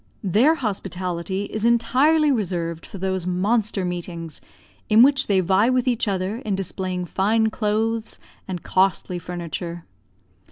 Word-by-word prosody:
Their 225 - +4
hospitality 190 - -3
is 215 +1 -5
entirely 260 +7 +3
reserved 170 -8 -2
for - - -9
those 190 -1 -2
monster 200 +2 0
meetings 170 -3 -5 0.5
in 220 +2 +7
which 275 0 +3
they 195 -2 +3
vie 190 +6 +3
with 255 0 +1
each 240 -2 +1
other 195 +2 -1
in 215 -5 -2
displaying 185 -1 -3
fine 220 +5 +1
clothes 220 +1 -1 0.3
and 180 -3 -5
costly 185 -1 +1
furniture. 175 -1 -6
195 Hz, 130 wpm, -23 LUFS, 180-225 Hz, 0.5 s, in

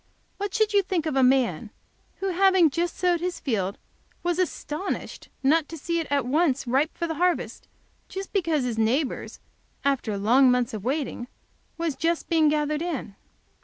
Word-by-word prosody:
What 405 0 -3
should 435 -1 +2
you 405 - +5
think 365 -4 -2
of 310 -3 -1
a 265 - +4
man 250 -7 +2 0.5
who, 390 - 0
having 375 -3 +4
just 340 +3 -2
sowed 355 -2 +2
his 355 +1 -3
field, 200 -7 -2 0.5
was 350 0 0
astonished 365 0 -3
not 305 +3 +3
to 330 - -7
see 335 +3 -1
it 325 - -3
at 280 -3 +1
once 280 0 +1
ripe 270 +6 0
for 340 - -1
the 325 - -2
harvest, 360 -1 0 0.7
because 330 -8 +1
his 235 -3 -2
neighbor's, 250 +6 -1 0.5
after 245 -7 0
long 245 +6 +5
months 250 -2 +1
of 210 -3 -5
waiting, 255 -1 -2 0.5
was 330 -4 -1
just 335 +2 -1
being 320 -3 +4
gathered 300 0 0
in?" 325 - -4
305 Hz, 165 wpm, -25 LUFS, 255-345 Hz, 0.7 s, you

